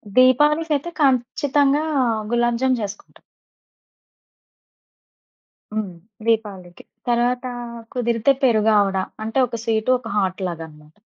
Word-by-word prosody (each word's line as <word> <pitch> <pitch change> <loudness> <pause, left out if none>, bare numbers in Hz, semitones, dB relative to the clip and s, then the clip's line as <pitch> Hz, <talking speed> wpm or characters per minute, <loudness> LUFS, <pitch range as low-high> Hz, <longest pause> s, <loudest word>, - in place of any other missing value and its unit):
దీపావళికయితే 295 +5 +3
ఖంచ్చితంగా 275 +2 +2 0.5
గులాబ్ 240 0 +1
జామ్ 255 -2 +2
చేసుకుంటాం. 205 0 -8 2.5
హ్మ్. 210 -4 -3 0.3
దీపావళికి. 205 -6 -2 0.2
తరవాత 245 +1 +1 0.5
కుదిరితే 235 +1 +2
పెరుగు 220 -3 +4
ఆవడ. 195 -1 +1 0.3
అంటే 225 +4 -3
ఒక 230 -1 -6
స్వీట్ 220 0 0
ఒక 245 -2 -11
హాట్ 190 -1 -1
లాగాన్నమాట. 155 -2 -10
235 Hz, 90 wpm, -21 LUFS, 210-255 Hz, 2.5 s, పెరుగు